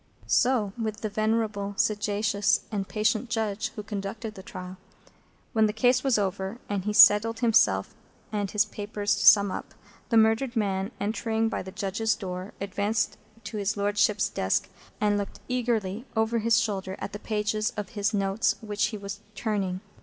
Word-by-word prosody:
So 235 -6 +2
with 215 -1 -3
the 215 - -2
venerable, 215 -1 -1
sagacious, 205 -1 +1
and 200 -3 -2
patient 215 +2 0
Judge 220 -1 -1
who 210 - -5
conducted 210 +1 -5
the 190 - -10
trial. 185 0 -8 0.8
When 220 -2 +4
the 210 - -2
case 245 +3 +3
was 270 -4 +3
over, 195 +1 -2
and 200 -2 -2
he 210 - 0
settled 220 +2 +6
himself 230 -3 +3 0.4
and 205 -2 -1
his 210 +2 +2
papers 205 0 -2
to 205 - -2
sum 200 -2 +8
up, - - -6 0.3
the 230 - +3
murdered 225 +3 +3
man, 195 -2 0
entering 220 +2 0
by - - -3
the 190 - -8
Judges' 200 +3 -1
door, 185 +1 -6
advanced 200 +2 -1 0.3
to 210 +1 -6
his 205 +1 -1
Lordship's 205 0 +2
desk, 95 - 0 0.3
and 205 -1 +2
looked 200 - -6
eagerly 235 -3 -1
over 220 +1 +1
his 230 +1 +3
shoulder 195 -4 -2
at - - -6
the 205 - -5
pages 215 0 -1
of 210 - -4
his 210 -3 -1
notes 195 -1 +1
which 210 -2 -1
he 215 - -3
was 200 0 -7 0.2
turning. 195 -4 -2
210 Hz, 170 wpm, -27 LUFS, 200-220 Hz, 0.8 s, sum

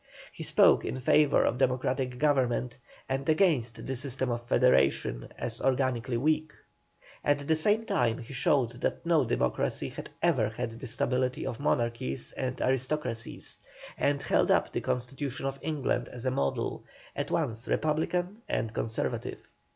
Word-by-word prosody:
He - - -9
spoke - - +5
in 130 +4 -3
favour 145 +3 +4
of 125 - 0
democratic 130 -1 0
government, 125 -4 +1 0.3
and 135 +3 -2
against 155 - +2
the 130 - -2
system 130 0 -1
of 120 0 -4
federation, 70 - +2
as - - -4
organically 130 -2 +1
weak. 155 +3 +1 0.7
At 145 -1 +1
the 160 - +4
same 210 +8 +2
time 120 - +1
he 120 +3 -9
showed 125 -1 +2
that - - -1
no 165 -5 +3
Democracy 65 - 0
had - - -8
ever 135 -12 +3
had 115 +2 -4
the 130 - -6
stability 125 +2 -1
of 115 - -4
Monarchies 120 -2 -1
and 130 -1 -3
Aristocracies, 130 -2 -2 0.4
and 140 0 0
held - - +2
up - - +3
the - - -1
constitution 130 +2 -3
of 135 0 -3
England 140 -5 -1
as 125 0 -8
a 130 - +2
model, 70 - -1 0.3
at - - -2
once 115 +2 -1
Republican 175 +6 0
and 110 -1 -1
Conservative. 115 +1 -3
130 Hz, 150 wpm, -29 LUFS, 120-145 Hz, 0.7 s, spoke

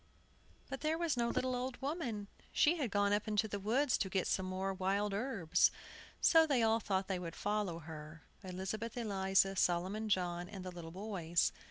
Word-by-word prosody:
But 270 0 -6
there 315 +1 +1
was 335 -4 0
no 235 -1 +1
little 255 +1 0
old 250 0 -3
woman. 265 - -3 0.2
She 330 +4 +4
had 270 -7 -1
gone 205 0 +2
up 205 +2 0
into 215 0 +1
the 205 -1 -4
woods 245 +7 +2
to 190 - 0
get 190 -1 0
some 190 -1 0
more 190 +1 -2
wild 195 +2 0
herbs, 200 -7 +2 0.5
so 325 -1 +6
they 265 -6 +3
all 225 0 +4
thought 195 -3 -1
they 190 -2 -1
would 170 -2 -6
follow 205 -4 -1
her, 155 -1 -9 0.2
Elizabeth 190 +6 -4
Eliza, 195 -3 +2
Solomon 190 +5 +1
John, 180 -2 0
and 190 -3 -8
the 185 - -4
little 170 -2 -8
boys. 175 -3 0
200 Hz, 185 wpm, -35 LUFS, 185-235 Hz, 0.5 s, so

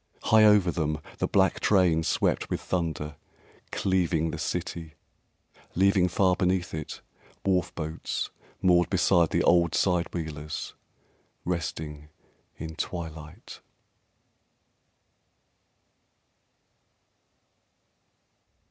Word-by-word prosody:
High 110 -1 +5
over 105 -4 +5
them 75 -2 -1 0.2
the - - +1
black - - +2
train 90 -5 +3
swept 80 - 0
with - - -2
thunder, 75 -4 -3 0.5
Cleaving 85 -4 0
the - - -6
city, 80 -2 -4 0.8
leaving 95 0 +4
far 90 0 +2
beneath 90 0 0
it 80 -2 -6 0.4
Wharf 90 -2 +1
boats 80 0 -4 0.3
moored 90 -2 +4
beside 90 -3 +3
the - - +1
old 85 -2 +3
side 90 -3 +1
wheelers 75 -3 -5 0.7
Resting 75 -3 -4 0.5
in 80 +1 -7
twilight. 80 -4 -7
85 Hz, 85 wpm, -27 LUFS, 80-90 Hz, 0.8 s, High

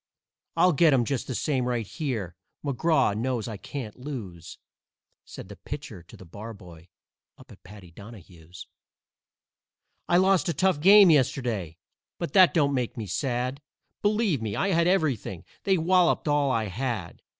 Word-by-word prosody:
I'll 180 - +5
get 155 0 +4
'em 125 -3 +2
just 135 0 -3
the 130 - -4
same 130 -2 -1
right 120 -3 -2
here 110 - -4 0.3
McGraw 140 -4 +1
knows 120 0 -2
I 110 -3 -6
can't 120 +1 -8
lose." 110 - -8 0.7
Said - - -10
the 100 - -10
Pitcher 145 - -8
to 85 - -16
the 95 - -13
Barboy 90 -3 -11 0.5
up - - -17
at - - -16
Paddy 95 -2 -14
Donahue's. 90 -4 -13 1.4
"I 175 - +4
lost 190 0 +3
a 165 - -2
tough 185 -1 +1
game 195 +2 +7
yesterday, 120 - 0 0.4
but 170 - -5
that 185 -3 +7
don't 145 -3 +1
make 125 -3 -2
me 110 - -4
sad; 125 - -3 0.4
Believe 205 - +1
me, 105 -2 -3
I 195 - 0
had 170 -2 +2
everything 140 - -1 0.2
they 195 -1 +3
walloped 175 0 +2
all 145 -1 +2
I 115 -4 0
had. 110 -3 -5
130 Hz, 155 wpm, -26 LUFS, 105-160 Hz, 1.4 s, game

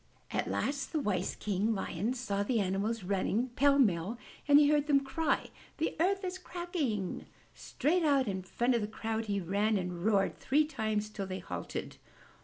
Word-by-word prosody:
At - - -1
last 280 0 -2
the 315 - +1
wise 195 -8 -1
King 210 +2 0
Lion 200 +5 -2
saw 205 -5 -2
the 225 +3 +1
animals 200 +3 -1
run 190 +1 0
ning 235 +6 +1
pell 280 +3 +3
mell, 205 -3 +2 0.3
and 290 0 +8
he 295 0 +6
heard 295 0 +3
them 280 -2 +4
cry, 320 +4 0 0.3
The 320 - -1
earth 385 +3 +2
is 370 0 -3
cracking!*' 320 - -3 0.3
Straight 335 +5 0
out 280 -4 +3
in 190 -2 -2
front 240 +7 0
of 235 - +1
the 210 - -2
crowd 220 +1 -3
he 200 -2 -1
ran 200 +4 +1
and 180 -2 -4
roared 200 -2 +2
three 300 +3 +3
times 215 -8 -1
till 200 -2 -5
they 185 0 -4
halted. - - -6
220 Hz, 185 wpm, -32 LUFS, 200-285 Hz, 0.3 s, and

